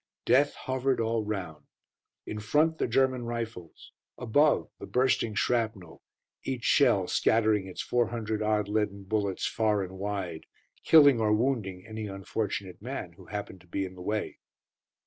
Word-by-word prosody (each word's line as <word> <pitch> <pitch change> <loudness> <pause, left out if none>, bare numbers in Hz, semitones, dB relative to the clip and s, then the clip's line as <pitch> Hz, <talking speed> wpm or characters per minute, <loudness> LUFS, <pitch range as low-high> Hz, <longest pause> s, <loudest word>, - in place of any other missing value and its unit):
Death 145 +2 +4
hovered 130 0 -1
all 115 0 0
round. 95 -7 -5 0.6
In 105 - -5
front 150 +9 +2
the - - +1
German 130 +1 +2
rifles, 115 -7 -6 0.3
above 145 +6 +2
the - - -8
bursting 125 -4 +1
shrapnel, 110 -9 -1 0.4
each 130 -3 -4
shell 115 -10 +4
scattering 110 -3 +2
its 95 - -5
four 120 -1 +1
hundred 110 -2 -3
odd 105 -1 +1
leaden 105 -1 -1
bullets 100 -1 -1
far 105 -3 +1
and 95 0 -8
wide, 95 -5 -4 0.4
killing 145 -6 +7
or 110 -1 +2
wounding 105 -5 0
any 110 -1 -6
unfortunate 100 -1 -4
man 115 -8 -5
who 90 +1 -16
happened 100 -2 -6
to 90 - -21
be 95 +3 -2
in 95 - -8
the 90 - -12
way. 105 +3 -3
110 Hz, 150 wpm, -28 LUFS, 95-120 Hz, 0.6 s, killing